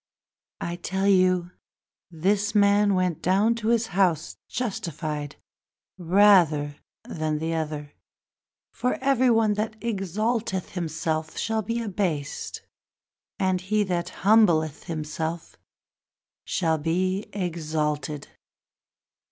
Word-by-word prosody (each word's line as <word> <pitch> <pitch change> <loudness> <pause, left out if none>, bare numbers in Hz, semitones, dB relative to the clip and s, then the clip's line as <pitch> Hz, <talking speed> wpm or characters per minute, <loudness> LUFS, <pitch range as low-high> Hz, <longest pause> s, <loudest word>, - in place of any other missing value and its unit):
I 170 0 -3
tell 190 +2 -1
you 185 -2 +3 0.6
that 165 -3 -14
this 205 +3 +2
man 205 0 +4
went 180 -3 0
to 215 +5 +2
his 235 0 +2
house 175 -4 +2
More - - -32
justified 155 - -4 0.6
than 160 -4 +2
the 160 +2 -2
other. 150 -2 -4 0.9
Every 260 0 +2
one 225 -2 +3
That 215 +1 -2
doth - - -18
exalt 215 +2 -1
himself 160 -4 -3
shall 220 0 0
be 230 +3 -2
abased, 180 -9 -3 0.7
And 185 -1 +1
he 210 +3 +1
that 175 -2 -2 0.2
humbleth 170 -8 +4
himself 160 +1 -4 0.9
shall 160 -3 0
be 185 +5 0
exalted! 155 -5 -2
185 Hz, 100 wpm, -25 LUFS, 160-205 Hz, 0.9 s, man